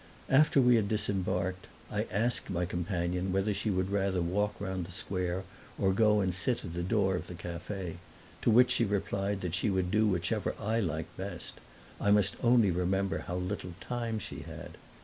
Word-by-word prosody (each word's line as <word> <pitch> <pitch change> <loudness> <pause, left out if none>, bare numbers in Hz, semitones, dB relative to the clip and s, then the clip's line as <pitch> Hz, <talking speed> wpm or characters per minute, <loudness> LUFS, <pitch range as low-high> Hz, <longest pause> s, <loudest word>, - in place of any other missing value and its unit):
After 145 +1 +5
we 125 -2 +6
had 105 -3 +1
disembarked 95 -3 0 0.2
I - - -1
asked 115 +4 0
my 90 -2 0
companion 90 +1 -2
whether 95 +3 +1
she 100 +2 -2
would 95 0 0
rather 100 -2 +1
walk 105 +4 0
round 95 -3 -3
the - - -11
square 90 0 -2 0.3
or 95 -1 +2
go 105 0 +4
and 95 -2 0
sit 115 +7 +1
at 85 - -6
the 85 - -2
door 95 0 +2
of - - -4
the 90 - -7
cafe; 85 +1 -5 0.4
to - - +2
which 125 +3 +6
she - - +3
replied 100 0 -1
that 90 -2 -3
she 95 +4 +1
would 95 -2 0
do 110 +2 +3
whichever 90 -4 0
I 110 +3 0
liked 80 -6 -3
best - - -6 0.4
I 100 - +1
must 100 -1 +4
only 120 -5 +5
remember 95 +2 0
again - - -8
how 90 - -3
little 90 0 -3
time 115 +2 -3
she 105 - -6
had. - - -9
95 Hz, 190 wpm, -31 LUFS, 90-105 Hz, 0.4 s, we